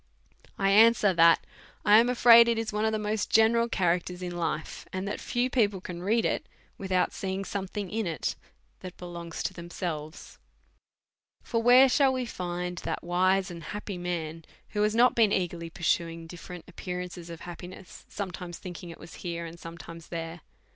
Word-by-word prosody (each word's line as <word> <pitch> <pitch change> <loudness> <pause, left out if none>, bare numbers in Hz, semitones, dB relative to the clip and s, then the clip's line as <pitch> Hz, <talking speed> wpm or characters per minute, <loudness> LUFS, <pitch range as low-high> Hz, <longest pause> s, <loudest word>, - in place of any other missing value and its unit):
1 195 - 0
answer, 215 -1 +6
that 165 -1 +5 0.4
i 210 +1 +8
am 235 +2 +3
afraid 235 -1 +8
it 235 -1 +2
is 225 -1 -3
one 210 +1 0
of 220 - +2
the 220 - 0
most 210 0 -2
ge - - +5
neral 230 +1 +2
characters 180 0 0
in 175 -1 -4
life; 160 -2 -3
and 185 +1 -3
that 205 - -3
few 245 +1 0
people 210 -7 +1
can 175 -1 -7
read 220 +5 +1
it, - - -1 0.3
without 190 -2 0
seeing 190 0 -3
sometiiing 195 +1 -4
in 220 -2 -1
it 160 -6 -2 0.4
that 185 -1 -9
belongs 170 -2 -6
to - - -2
themselves. 170 -2 -6 1.0
For 230 - -1
where 250 +3 +7
shall 265 +1 +3
we 255 -1 -2
find 180 -4 -4
that - - -4
wise 185 +2 +2
and 170 -1 -8
happy 205 +2 -6
man 165 -2 -4 0.3
who 210 - -2
has 210 +1 +2
not 245 +2 +5
been 220 -3 +4
eagerly 175 -3 -1
pursuing 165 0 -1
differ 175 +2 -10
ent 175 - -9
appearances 180 -1 -6
of 170 -1 -8
happiness, 180 +1 -10
sometimes 180 -3 -6
thinking 175 -1 -8
it 165 - -9
was 165 - -12
here, 170 -1 -4
and 165 +1 -9
sometimes 165 0 -10
there? 165 0 -6
180 Hz, 180 wpm, -28 LUFS, 170-210 Hz, 1.0 s, i